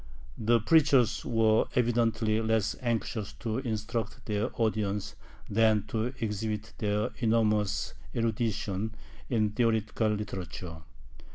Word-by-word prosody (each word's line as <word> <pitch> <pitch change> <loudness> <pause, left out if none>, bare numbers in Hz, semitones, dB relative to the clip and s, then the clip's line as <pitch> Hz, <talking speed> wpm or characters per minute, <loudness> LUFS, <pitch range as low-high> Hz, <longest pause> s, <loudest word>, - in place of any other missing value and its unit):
The 115 +1 +3
preachers 125 -3 +4
were 110 -2 +3
evidently 115 -2 +2
less 110 -1 +1
anxious 115 -3 -2
to 115 +1 -3
instruct 115 -1 -3
their 105 +2 0
audience 105 -2 0 0.3
than 110 -1 +3
to 110 0 0
exhibit 110 0 -3
their 105 0 0
enormous 110 -3 +1 0.2
erudition 110 -2 -1 0.3
in 110 -4 +2
theological 110 -1 +1
literature. 95 -5 -5
110 Hz, 100 wpm, -29 LUFS, 105-115 Hz, 0.3 s, preachers